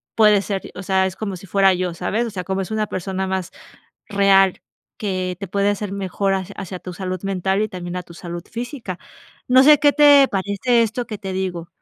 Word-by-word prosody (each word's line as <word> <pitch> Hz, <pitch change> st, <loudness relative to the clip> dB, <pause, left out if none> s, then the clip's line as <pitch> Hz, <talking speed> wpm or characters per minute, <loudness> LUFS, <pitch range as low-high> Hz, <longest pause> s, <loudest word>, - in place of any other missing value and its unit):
puede 210 Hz, -2 st, +5 dB
ser, 195 Hz, -1 st, -4 dB
o 185 Hz, -, -7 dB
sea, 190 Hz, 0 st, +2 dB
es 185 Hz, -, -6 dB
como 200 Hz, -3 st, -4 dB
si 185 Hz, -, -12 dB
fuera 195 Hz, +1 st, +4 dB
yo, 180 Hz, -1 st, -2 dB
¿sabes? 220 Hz, +7 st, -1 dB
O 225 Hz, -, -6 dB
sea, 180 Hz, -3 st, -5 dB
como 195 Hz, 0 st, -1 dB
es 190 Hz, -, -6 dB
una 215 Hz, -1 st, -1 dB
persona 190 Hz, +1 st, -3 dB
más 190 Hz, -2 st, -3 dB, 0.6 s
real 195 Hz, -2 st, +4 dB, 0.4 s
que 185 Hz, -3 st, -2 dB
te 195 Hz, -, -5 dB
puede 200 Hz, +1 st, +1 dB
hacer 205 Hz, -1 st, -3 dB
mejor 195 Hz, 0 st, -1 dB
ha 190 Hz, -, -3 dB
hacia 190 Hz, -2 st, -6 dB
tu 180 Hz, -, -8 dB
salud 185 Hz, -1 st, -4 dB
mental 195 Hz, +1 st, 0 dB
y 215 Hz, -, 0 dB
también 180 Hz, -1 st, -6 dB
a -, -, -3 dB
tu 170 Hz, -, -14 dB
salud 175 Hz, 0 st, -7 dB
física, 235 Hz, -, -6 dB, 0.5 s
no 255 Hz, +1 st, +7 dB
sé, 300 Hz, +1 st, +8 dB
qué 290 Hz, -, +5 dB
te 290 Hz, -2 st, +7 dB
parece 200 Hz, +5 st, +1 dB
esto 230 Hz, +2 st, -3 dB
que 215 Hz, -, -5 dB
te 190 Hz, -1 st, -6 dB
digo. 180 Hz, -3 st, -3 dB
195 Hz, 220 wpm, -21 LUFS, 185-210 Hz, 0.6 s, sé